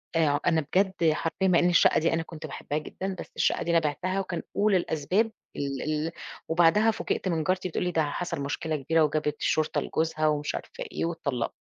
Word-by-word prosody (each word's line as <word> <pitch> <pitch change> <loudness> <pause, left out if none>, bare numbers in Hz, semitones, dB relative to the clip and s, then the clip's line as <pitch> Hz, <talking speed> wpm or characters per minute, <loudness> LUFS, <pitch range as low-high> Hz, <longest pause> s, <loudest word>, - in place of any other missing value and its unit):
آآ 165 -1 +4
ع 145 0 +2
أنا 165 -2 +3
بجد 180 +1 +2
حرفيًا 165 +5 -1
مع 180 -2 +5
إن 175 - +3
الشقة 175 - +5
دي 165 +1 +1
أنا 165 0 0
كنت 160 -1 -9
باحبها 150 0 -4
جدًا، 190 +5 -5
بس - - -8
الشقة - - +1
دي 170 - -1
أنا 170 - +5
بيعتها، 180 +5 -1
وكان 180 -3 -3
أُولى 205 -1 +3
الأسباب 180 +7 0 0.2
ال 140 -1 -3
ال 155 +1 -1 0.4
وبعدها 175 +7 +4
فوجئت 200 - -2
من 165 -3 0
جارتي 185 +2 0
بتقول 170 - -2
لي 180 - 0
ده 160 -2 +2
حصَل 175 -5 -3
مشكلة 150 +3 -2
كبيرة 160 +3 +2
وجابت 150 0 0
الشرطة 155 -1 +1
لجوزها 160 -1 0
ومش 150 -1 0
عارفة - - -6
إيه - - -2
واتطلقت. 140 -8 -2
165 Hz, 205 wpm, -27 LUFS, 155-180 Hz, 0.4 s, مع